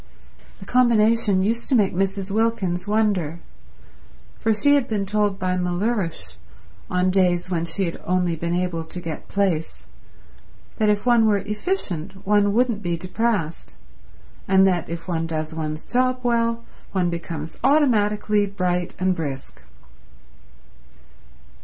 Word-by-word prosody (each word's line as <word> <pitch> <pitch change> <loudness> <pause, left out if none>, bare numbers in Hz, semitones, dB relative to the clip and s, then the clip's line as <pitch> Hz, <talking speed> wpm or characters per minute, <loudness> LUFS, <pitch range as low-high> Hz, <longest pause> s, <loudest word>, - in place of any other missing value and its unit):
The - - -10
combination 225 -5 +3
used 230 +3 -1
to 265 - +3
make 205 -5 +3
Mrs. 195 +1 -1
Wilkins 205 -4 0
wonder, 200 -7 0 1.0
for 225 - +1
she 285 +7 +3
had 285 -4 +3
been 205 -3 -1
told 205 0 0
by 185 -1 -1
Mellersh, 180 +1 -2 0.5
on 180 +1 +1
days 185 -1 +1
when 170 -2 0
she 180 +3 -1
had 170 - -5
only 180 -1 0
been 170 +2 -2
able 180 -2 -1
to 160 +2 -8
get 165 -3 -6
plaice, 185 -6 -1 0.9
that 215 -1 +3
if 205 +1 +1
one 235 -2 +5
were 210 -1 +3
efficient 200 - -3
one 205 0 +3
wouldn't 230 -1 +1
be 175 -3 -1
depressed, 185 - -2 0.7
and 190 0 +5
that 180 -4 +1
if 170 +1 -6
one 165 -2 -1
does 155 0 -3
one's 155 -1 -4
job 255 +1 +1
well 230 -1 +1 0.3
one 180 -3 +1
becomes 165 -2 -5
automatically 210 -7 +3
bright 180 -3 -2
and 185 0 +1
brisk. 140 - -6
195 Hz, 135 wpm, -23 LUFS, 175-215 Hz, 1.0 s, one